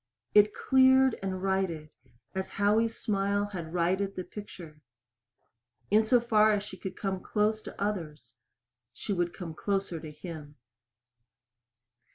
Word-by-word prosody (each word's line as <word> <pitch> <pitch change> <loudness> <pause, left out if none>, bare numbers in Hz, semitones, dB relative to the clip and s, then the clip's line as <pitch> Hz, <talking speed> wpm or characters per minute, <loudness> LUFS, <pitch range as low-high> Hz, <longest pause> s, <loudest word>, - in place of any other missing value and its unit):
It 210 0 +5
cleared 260 -1 +4
and 190 -1 -3
righted 185 -6 -1 0.4
as 190 0 -3
Howie's 215 +3 +1
smile 200 0 0
had 175 -6 -6
righted 185 +3 0
the 185 - -4
picture. 175 -7 -10 1.1
In 215 +2 +5
so 245 +3 +4
far 220 -2 +4
as 205 -1 0
she 205 - -8
could 190 0 -7
come 195 -2 -2
close 215 +2 0
to - - -10
others 160 -11 -4 0.6
she 200 - -4
would 175 -2 0
come 170 -3 -7
closer 195 -1 -2
to 155 - -8
him. 150 -1 -9
195 Hz, 135 wpm, -29 LUFS, 170-210 Hz, 1.1 s, It